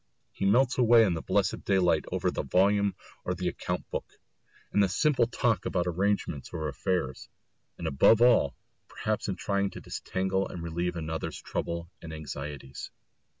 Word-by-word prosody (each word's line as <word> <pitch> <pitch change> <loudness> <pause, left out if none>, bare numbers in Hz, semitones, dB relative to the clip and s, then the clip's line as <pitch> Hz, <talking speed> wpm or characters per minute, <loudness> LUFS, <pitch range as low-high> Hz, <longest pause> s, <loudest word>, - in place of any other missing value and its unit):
He 95 - -1
melts 125 +6 +3
away 120 -1 +7
in 95 -5 +2
the 80 - -3
blessed - - 0
daylight 90 -5 +2
over - - 0
the - - -2
volume 100 +2 +2 0.3
or 90 - -2
the 90 0 -2
account - - -3
book, - - -5 0.5
in - - +3
the 100 -2 +4
simple 125 +3 +2
talk 120 -2 +1
about 90 -2 0
arrangements 90 -5 -1
or 80 -1 -3
affairs, 70 -1 -2 0.5
and - - -6
above 70 +11 +5
all 115 - +5 0.3
perhaps 110 -1 -2
in 95 - -1
trying 100 +1 0
to - - -9
disentangle 95 +1 -2
and 85 - -7
relieve 85 +1 -2
another's 80 -1 -4
troubles 85 0 -3 0.2
and 80 -1 -8
anxieties. 75 -3 -7
90 Hz, 160 wpm, -29 LUFS, 80-100 Hz, 0.5 s, away